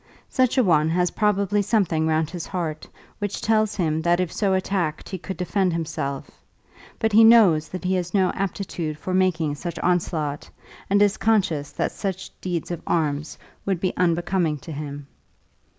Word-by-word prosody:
Such 255 -1 +1
a 255 - +5
one 160 -5 +3
has 180 +1 +1
probably 205 -1 +1
something 185 -7 +1
round 160 0 +1
his 175 -2 -6
heart 165 -5 -4 0.3
which 205 -1 -3
tells 215 -1 +1
him 160 -4 0
that 175 +1 +2
if 180 -3 -1
so 195 -3 +1
attacked 185 -5 -2
he 190 - -5
could 190 +1 -6
defend 185 0 0
himself; 155 -4 -4 0.6
but 220 - 0
he 225 +2 +8
knows 210 -9 +6
that 185 - -6
he 185 +1 0
has 180 -1 -1
no 190 -3 +2
aptitude 180 -5 -3
for 185 - -4
making 175 -5 +1
such 170 +3 -6
onslaught, 160 -5 -1 0.4
and 200 +1 +4
is 205 0 +2
conscious 190 -10 +1
that - - -1
such 190 -1 -4
deeds 175 -2 -3
of 170 - -4
arms 150 -2 -1 0.3
would 195 -3 -1
be 185 +1 -1
unbecoming 175 -2 +1
to 155 +4 -10
him. 145 -1 -6
180 Hz, 170 wpm, -23 LUFS, 160-195 Hz, 0.6 s, he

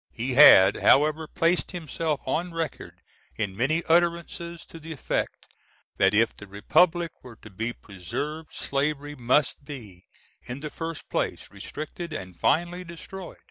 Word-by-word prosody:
He 125 +3 -2
had, 125 -8 +8
however, 155 +2 +4
placed 170 +4 0
himself 160 -3 -3
on 170 +1 -2
record 165 -1 -5 0.3
in 100 -4 -3
many 150 - +1
utterances 170 0 0
to 165 - -11
the 165 +1 -9
effect 150 - -3 0.4
that 95 +1 +4
if 115 +2 +3
the 105 - -12
republic 165 - +2
were 125 -2 -12
to 105 -1 -14
be 115 +5 -3
preserved, 120 - -6
slavery 145 +1 -2
must 130 +2 +1
be, 110 -11 -10 0.3
in 125 +3 -7
the 150 -1 -5
first 165 -1 -6
place, - - -2
restricted, 160 +2 -7
and 95 - -7
finally 175 +2 +1
destroyed. 180 +2 -9
150 Hz, 140 wpm, -26 LUFS, 120-165 Hz, 0.4 s, had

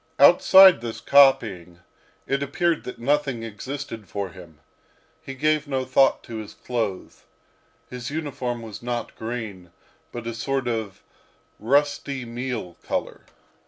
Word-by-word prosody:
Outside 180 +2 +8
this 115 -1 -5
copying, 100 -12 +3 0.4
it 140 0 -1
appeared 160 +4 0
that 125 - -7
nothing 135 -1 0
existed 115 0 -7
for 100 -2 -4
him. 85 -4 -14 0.6
He 135 - -8
gave 155 +2 +1
no 135 -2 -2
thought 130 +1 +3
to 115 -2 -7
his 110 -2 -8
clothes. 110 -6 -4 0.6
His 125 -1 -7
uniform 130 -6 -4
was 110 -2 -9
not 120 -1 -4
green, 110 -6 -6 0.4
but 120 -1 -7
a 115 - -3
sort 130 +3 -2
of 110 -5 -4 0.6
rusty 140 +1 0
meal 115 -6 -5
colour. - - -4
120 Hz, 125 wpm, -24 LUFS, 110-140 Hz, 0.6 s, Outside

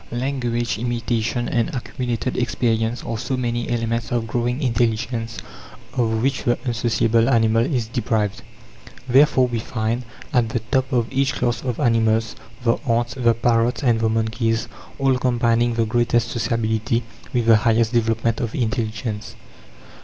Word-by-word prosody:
Language, 120 -2 -2
imitation, 120 0 -1
and 115 +2 0
accumulated 125 -1 -3
experience 115 -1 0
are 115 -2 -4
so 130 +1 -2
many 120 -1 -2
elements 115 -1 -1
of 120 -2 0
growing 120 +3 -1
intelligence 115 -1 -1 0.6
of 110 -2 0
which 135 0 +1
the 120 0 +2
unsociable 115 -2 +2
animal 115 0 +3
is 125 -4 -1
deprived. 110 -2 -1 0.7
Therefore 130 0 +5
we 120 -2 -2
find, 115 +1 -2 0.3
at 120 -4 +2
the 120 - -1
top 130 0 +1
of 120 -3 +2
each 135 0 +1
class 120 -1 -1
of 125 -4 -3
animals, 115 -4 +2 0.3
the 115 -1 +2
ants, 120 +1 +1
the 120 -3 +2
parrots, 115 +3 +1
and 120 -3 +3
the 110 0 +1
monkeys, 115 +1 0 0.3
all 135 -2 +2
combining 120 -1 +2
the 115 -1 +2
greatest 120 +1 +1
sociability 115 0 0 0.3
with 120 -4 0
the 115 -1 +7
highest 115 +1 +2
development 115 -1 +1
of 115 -2 -3
intelligence. 110 -2 -3
115 Hz, 145 wpm, -22 LUFS, 115-120 Hz, 0.7 s, the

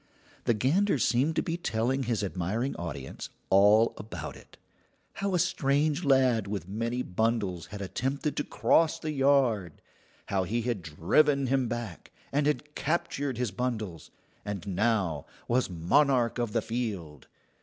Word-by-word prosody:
The 120 - +3
gander 155 - +2
seemed 135 +6 +2
to - - +1
be 165 0 -2
telling 130 -3 0
his 115 -4 -1
admiring 100 +7 -2
audience 70 -6 -6 0.2
all 105 +4 +6
about 110 - -7
it: - - -16 0.6
how 195 -1 -1
a - - +4
strange 150 -2 +1
lad 130 -7 +3
with 100 -4 -4
many 115 +5 -2
bundles 100 -3 -1
had 100 -1 -6
attempted 135 - -2
to 145 - +1
cross 160 +2 +2
the 155 - -4
yard; 135 - +2 0.5
how 95 -1 0
he 115 +6 -1
had 120 -5 -1
driven 135 - +2
him 130 -1 +1
back, 115 -7 -6 0.2
and 145 +1 +1
had 150 0 -1
captured 140 -4 -1
his 125 -4 -1
bundles, 110 -7 -3 0.3
and 100 -3 -5
now 100 -6 0 0.2
was 125 -1 +1
monarch 120 - +2
of 120 -3 -1
the 115 +1 0
field. 105 - -4
120 Hz, 145 wpm, -29 LUFS, 100-140 Hz, 0.6 s, all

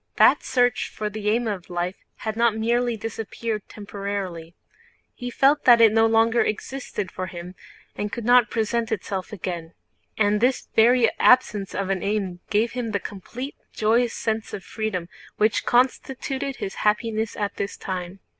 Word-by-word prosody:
That - - +6
search 245 -2 +1
for 210 -1 -4
the 210 0 -2
aim 230 +2 +1
of 195 -5 -4
life 175 +1 -2 0.2
had 220 -1 -4
not 230 -1 +2
merely 235 +1 +1
disappeared 225 0 -4
temporarily—he 200 +2 -7
felt 275 +4 +3
that 240 -2 +8
it 225 -2 +7
no 225 0 +5
longer 225 +1 +3
existed 215 -3 -3
for 185 0 -4
him 175 +1 -8 0.4
and 210 0 -3
could 235 - -5
not 245 -2 +5
present 225 +1 -1
itself 195 -2 -3
again. 175 -4 -5 0.4
And 210 0 +2
this 250 +2 +1
very 235 +1 +6
absence 210 -6 +4
of 195 -1 -1
an 190 -2 -1
aim 200 -3 -2
gave 220 +2 +2
him 240 -3 -4
the 200 - +1
complete, 240 +9 -7 0.2
joyous 230 +2 +2
sense 220 -1 -2
of 195 - -8
freedom 215 -6 -3 0.3
which 215 0 +1
constituted 265 +2 0
his 195 - -5
happiness 220 +1 0
at 205 -1 -3
this 200 - -3
time. 185 0 -5
215 Hz, 155 wpm, -24 LUFS, 195-235 Hz, 0.4 s, that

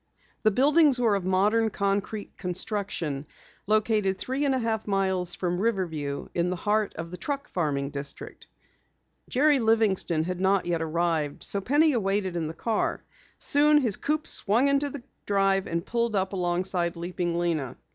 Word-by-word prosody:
The 215 - +4
buildings 285 +5 +4
were 230 -4 +3
of 195 -3 -1
modern 210 +4 +2
concrete 200 +1 -2
construction, 180 -6 -2 0.4
located 215 -2 +2
three 265 +7 -2
and 270 -2 +2
a - - +1
half 225 -3 -2
miles 190 -3 0
from 175 -1 -2
Riverview 165 -10 -2
in 175 +1 0
the 180 - -1
heart 210 +3 0
of 165 +1 -6
the 180 - -6
truck 280 +8 -4
farming 145 -5 -2
district. 140 0 -6 0.8
Jerry 285 +2 +3
Livingston 220 -8 +2
had 180 +1 -4
not 195 0 +2
yet 170 -1 -1
arrived, 160 -2 -1
so 200 - +1
Penny 295 +6 +3
waited 195 -3 -1
in 165 -2 -2
the 160 - -7
car. 225 +3 -1 0.3
Soon 300 +1 +4
his 240 -9 +3
coupe 305 +1 -2
swung 230 +7 +2
into 280 +1 +1
the 275 -3 -8 0.2
drive 195 -1 +2
and 170 +2 -2
pulled 235 -2 0
up 190 0 0
alongside 175 -1 -1
Leaping 175 0 -3
Lena. 165 -7 -1
195 Hz, 160 wpm, -26 LUFS, 175-225 Hz, 0.8 s, The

